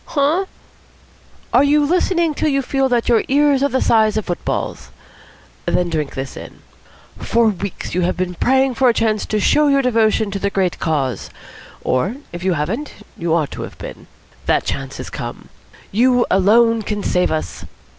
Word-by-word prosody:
"Huh?" 310 +6 +1 1.1
"Are 255 - +6
you 290 +1 +3
listening 345 0 +1
till 305 - 0
you 275 -1 +1
feel 270 +1 0
that 240 -2 +1
your 235 -2 +3
ears 285 0 +3
are 280 - +2
the 260 0 0
size 220 -2 +3
of 215 - -2
footballs? 175 - -3 0.8
Then 175 -1 +1
drink 150 -3 -2
this 135 0 -5
in. - - -11 0.6
For 230 -1 +2
weeks 200 -1 -5
you 180 - 0
have 180 +1 0
been 185 -1 -2
praying 265 +7 +2
for 255 +1 +3
a 235 - +1
chance 220 -2 0
to 215 - 0
show 300 +8 +3
your 275 -1 +3
devotion 220 -3 +2
to 195 - -3
the 200 - 0
great 190 -3 -1
cause; 140 -6 -1 0.5
or 130 - 0 0.2
if 175 +1 -6
you 190 -1 +2
haven't, 190 - -3 0.2
you 165 -1 0
ought 155 -5 0
to - - -6
have - - -8
been. - - -9 0.4
That - - +2
chance - - -4
has - - -7
come. - - -7 0.4
You 245 +3 +3
alone 225 +4 +4
can 205 -1 -3
save 180 0 +1
us. 155 -1 -4
225 Hz, 180 wpm, -19 LUFS, 180-270 Hz, 1.1 s, Are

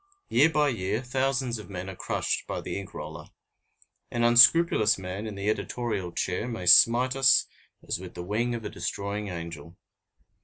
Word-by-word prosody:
Year 145 +7 +4
by 150 -2 +2
year, 110 0 -2
thousands 130 -2 -1
of 105 - -11
men 95 -1 -6
are 95 - -7
crushed - - -3
by - - -4
the - - -6
ink 100 - -10
roller. - - -8 0.8
An 120 -1 -2
unscrupulous 120 -1 +5
man 95 +3 -6
in 105 - -7
the 100 +1 -5
editorial 110 -4 -2
chair 95 +6 -3
may 115 -7 -5
smite 120 +8 +5
as 130 -3 +4 0.5
with 90 -1 -10
the 85 - -6
wing 115 +6 -1
of 115 -2 -7
a - - -3
destroying 100 +1 -4
angel. 85 -2 -8
110 Hz, 165 wpm, -27 LUFS, 95-120 Hz, 0.8 s, unscrupulous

